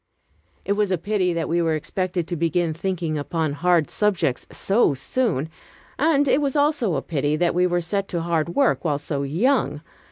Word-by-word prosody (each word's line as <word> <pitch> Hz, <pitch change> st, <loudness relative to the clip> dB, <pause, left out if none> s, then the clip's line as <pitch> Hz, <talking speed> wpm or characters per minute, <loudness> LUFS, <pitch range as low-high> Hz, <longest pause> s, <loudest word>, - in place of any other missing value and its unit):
It -, -, -2 dB
was 205 Hz, -1 st, 0 dB
a 185 Hz, -, +2 dB
pity 190 Hz, 0 st, 0 dB
that 165 Hz, -1 st, -2 dB
we 170 Hz, +1 st, +1 dB
were 165 Hz, -1 st, +1 dB
expected 180 Hz, +2 st, -2 dB
to 175 Hz, -, -3 dB
begin 170 Hz, 0 st, 0 dB
thinking 170 Hz, -2 st, -2 dB
upon 160 Hz, +1 st, -2 dB
hard 170 Hz, 0 st, +2 dB
subjects 195 Hz, -11 st, 0 dB
so 195 Hz, -, +2 dB
soon, 165 Hz, -, -1 dB, 0.5 s
and 290 Hz, -1 st, +3 dB
it 270 Hz, +2 st, +3 dB
was 280 Hz, -1 st, -1 dB
also 285 Hz, -, +2 dB
a 135 Hz, -, -2 dB
pity 145 Hz, -1 st, -1 dB
that 170 Hz, +2 st, +1 dB
we 180 Hz, +1 st, +3 dB
were 175 Hz, 0 st, 0 dB
set 195 Hz, +4 st, -2 dB
to 170 Hz, -, -2 dB
hard 170 Hz, 0 st, -1 dB
work 275 Hz, -3 st, +2 dB
while 150 Hz, -4 st, +1 dB
so 145 Hz, -1 st, -3 dB
young. 150 Hz, -, +1 dB
175 Hz, 190 wpm, -23 LUFS, 155-205 Hz, 0.5 s, and